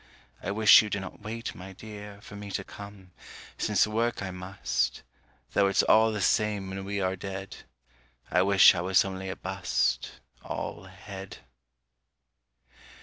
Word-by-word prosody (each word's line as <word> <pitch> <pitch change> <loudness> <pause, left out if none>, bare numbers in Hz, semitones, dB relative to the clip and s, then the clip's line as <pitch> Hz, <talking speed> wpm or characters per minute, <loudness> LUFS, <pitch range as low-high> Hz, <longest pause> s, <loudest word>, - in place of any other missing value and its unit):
I - - -4
wish 110 +1 +8
you 105 - -4
did 100 -1 -2
not 95 - -9
wait, 115 +2 -5
my 95 +2 -10
dear, 105 0 -10
For 100 - -11
me 100 0 -8
to 100 - -2
come: 100 -2 -11 0.5
since 105 -2 +3
work 115 0 -1
I 95 - -4
must: 90 +1 -2 0.5
Though 100 - +4
it's 100 - +3
all 110 0 +5
the 105 -2 -3
same 105 -2 +1
when 95 0 -5
we 100 0 -2
are 95 0 0
dead. 95 +1 -7 0.7
I 90 - +4
wish 95 0 +7
I 85 - -2
was 95 +2 +3
only 95 0 -5
a 95 - -4
bust, 95 -1 -1 0.3
All 85 - -5
head. 95 +1 -10
100 Hz, 155 wpm, -28 LUFS, 95-105 Hz, 0.7 s, wish